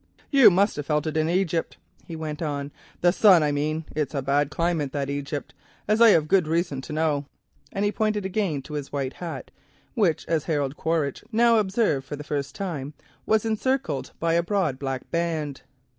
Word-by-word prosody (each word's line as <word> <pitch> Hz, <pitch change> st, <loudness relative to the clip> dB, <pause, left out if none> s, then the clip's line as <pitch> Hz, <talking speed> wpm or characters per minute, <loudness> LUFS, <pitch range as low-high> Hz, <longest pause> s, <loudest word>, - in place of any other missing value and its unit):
"You 275 Hz, -4 st, +8 dB
must 195 Hz, +1 st, +2 dB
have 145 Hz, -, -4 dB
felt 150 Hz, -1 st, +1 dB
it 155 Hz, -, -3 dB
in 155 Hz, 0 st, +1 dB
Egypt," 170 Hz, -2 st, 0 dB, 0.3 s
he 165 Hz, -, -6 dB
went 155 Hz, -1 st, -5 dB
on 145 Hz, -2 st, -3 dB, 0.3 s
—"the 175 Hz, -, +5 dB
sun 185 Hz, -4 st, +6 dB
I 150 Hz, -, +1 dB
mean. 155 Hz, +2 st, -1 dB
It's 150 Hz, 0 st, -2 dB
a 140 Hz, -, 0 dB
bad 140 Hz, +1 st, +1 dB
climate, 160 Hz, -3 st, -1 dB
that 140 Hz, -1 st, -2 dB
Egypt, 140 Hz, +1 st, -4 dB, 0.3 s
as 215 Hz, +2 st, +2 dB
I 230 Hz, -, +9 dB
have 160 Hz, -7 st, +4 dB
good 185 Hz, -2 st, +3 dB
reason 165 Hz, -4 st, -1 dB
to 145 Hz, -, -9 dB
know," 150 Hz, -2 st, 0 dB, 0.4 s
and 200 Hz, +1 st, -1 dB
he 205 Hz, -, +2 dB
pointed 215 Hz, -2 st, -1 dB
again 190 Hz, -8 st, -1 dB
to 150 Hz, -, -10 dB
his 145 Hz, -2 st, -5 dB
white 140 Hz, -2 st, -2 dB
hat, 170 Hz, -2 st, -7 dB, 0.4 s
which 195 Hz, -, +1 dB
Harold 150 Hz, -3 st, -1 dB
Quaritch 160 Hz, -4 st, -1 dB
now 230 Hz, 0 st, +4 dB
observed 190 Hz, -, 0 dB
for 145 Hz, -, -4 dB
the 150 Hz, -, -8 dB
first 145 Hz, -2 st, -3 dB
time 155 Hz, -7 st, -4 dB, 0.3 s
was 220 Hz, 0 st, +2 dB
encircled 220 Hz, -, -1 dB
by 165 Hz, 0 st, +1 dB
a 170 Hz, -, +4 dB
broad 170 Hz, -7 st, -1 dB
black 135 Hz, -2 st, -4 dB
band. 160 Hz, -4 st, -2 dB
160 Hz, 190 wpm, -25 LUFS, 145-190 Hz, 0.4 s, I